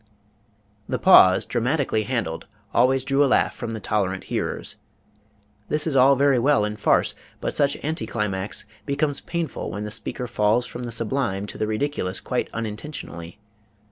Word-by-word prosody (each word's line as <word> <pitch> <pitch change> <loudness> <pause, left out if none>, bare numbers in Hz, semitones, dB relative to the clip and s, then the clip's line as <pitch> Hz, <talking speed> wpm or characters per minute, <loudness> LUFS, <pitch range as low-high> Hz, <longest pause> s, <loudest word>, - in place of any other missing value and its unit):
The - - 0
pause, 95 +1 +7
dramatically 125 -2 0
handled, 105 -10 -3 0.3
always 130 +2 +3
drew 140 +1 +2
a - - +3
laugh - - +2
from 120 - -5
the 110 -1 -4
tolerant 95 -3 -1
hearers. - - -3 0.9
This 150 0 +1
is 155 -4 -1
all 135 +1 +6
very 140 -1 +3
well 135 -3 +3
in 105 0 -3
farce, 105 - +2 0.3
but - - -3
such 140 -1 +2
anti 160 +3 -2
climax 105 -3 -3 0.2
becomes 145 0 0
painful 170 -4 -4
when 105 - -5
the 105 - -5
speaker 125 - -3
falls 110 +1 +2
from 125 0 -7
the 120 - -5
sublime 115 -3 -1
to - - -9
the 110 - 0
ridiculous 110 -5 -2
quite 125 - -2
unintentionally. 105 - -6
120 Hz, 160 wpm, -24 LUFS, 105-140 Hz, 0.9 s, pause